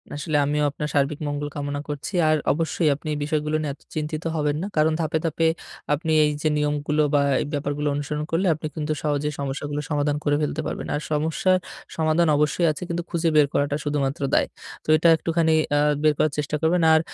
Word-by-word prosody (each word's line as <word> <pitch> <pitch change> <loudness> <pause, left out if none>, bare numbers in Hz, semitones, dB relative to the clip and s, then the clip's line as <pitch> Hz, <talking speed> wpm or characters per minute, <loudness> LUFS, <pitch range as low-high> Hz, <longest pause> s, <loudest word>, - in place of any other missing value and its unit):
আসলে 150 +1 -1
আমিও 150 +1 0
আপনার 150 +1 -4
সার্বিক 140 +1 +1
মঙ্গল 145 0 -2
কামনা 145 0 -3
করছি। 145 +6 -5 0.2
আর 155 - +4 0.2
অবশ্যই 160 +1 0
আপনি 150 - -11
এই - - -2
বিষয়গুলো 150 0 -1
নিয়ে 145 -2 -2
এত - - -19
চিন্তিত 155 0 -3
হবেন 150 -1 0
না। 195 - -3
কারণ 155 +1 +4
ধাপে, 160 0 0
ধাপে 165 0 +1 0.5
আপনি 160 +2 -1
এই 150 - +3
যে 155 - +1
নিয়মগুলো 150 +1 0
বা 145 - +4 0.2
এই - - -2
ব্যাপারগুলো 145 +1 -2
অনুসরণ 150 +1 -3
করলে 180 +4 +1
আপনি 155 0 -5
কিন্তু 155 0 -1
সহজেই 150 0 0
সমস্যাগুলো 145 +1 -3
সমাধান 145 -1 0
করে 145 -1 +2
ফেলতে 150 +1 -1
পারবেন। - - -4
আর 150 - -2
সমস্যার 160 +5 +2 0.4
সমাধান 160 +1 +2
অবশ্যই 150 +3 +2
আছে 150 - -6
কিন্তু 170 0 -2
খুঁজে 170 -1 +1
বের 150 -2 +6
করাটা 145 0 +1
শুধুমাত্র 145 -2 -1
দায়। - - +3 0.4
তো - - -24
এটা 170 - +3
একটুখানি 165 0 +1 0.3
আ - - +4 0.2
বের 155 -1 +5
করার 155 - +2
চেষ্টা 150 +1 -1
করবেন। 170 +2 +2
আর 160 - +6
150 Hz, 200 wpm, -24 LUFS, 145-160 Hz, 0.5 s, বের